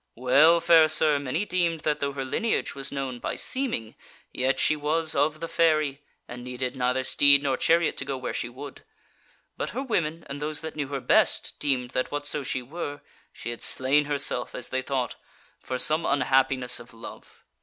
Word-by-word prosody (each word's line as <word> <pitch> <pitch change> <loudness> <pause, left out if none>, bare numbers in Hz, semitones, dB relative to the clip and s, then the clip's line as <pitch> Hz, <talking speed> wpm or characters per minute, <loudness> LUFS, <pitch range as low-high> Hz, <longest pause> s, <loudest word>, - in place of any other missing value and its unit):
Well, 145 +7 +5
fair 165 -1 +6
sir, 155 -1 +4
many 145 +8 -2
deemed 170 -4 0
that 150 -1 0
though 140 0 -2
her 135 -1 -4
lineage 220 - -1
was 135 0 -6
known 135 -3 -4
by - - -3
seeming, 235 - -2 0.4
yet 130 +1 0
she 155 - +3
was 155 +2 0
of 150 +3 0
the 165 - -3
fairy, 155 -4 +1 0.3
and 120 0 -8
needed 125 0 -4
neither 125 +1 0
steed 140 +1 +5
nor 135 -2 +1
chariot 170 +5 +2
to 135 - -4
go 135 -1 -3
where 130 - -4
she 120 - -3
would. 135 +3 -10 0.7
But - - -3
her 265 - -1
women 165 - -2
and 140 +1 -7
those 150 0 -3
that 160 0 -7
knew 145 -2 -3
her 140 -1 -4
best, - - +2
deemed 130 -4 -1
that 130 - -1
whatso 145 0 -2
she 130 -2 -3
were, 145 +1 -6 0.3
she 120 - -7
had 120 - -8
slain 140 +3 +2
herself, 140 -4 -2
as 125 - -4
they 130 - -1
thought, 130 -1 -3 0.4
for 130 - -4
some 155 +5 +1
unhappiness 130 -2 +2
of 115 - -14
love. 115 - -12
140 Hz, 190 wpm, -26 LUFS, 130-155 Hz, 0.7 s, fair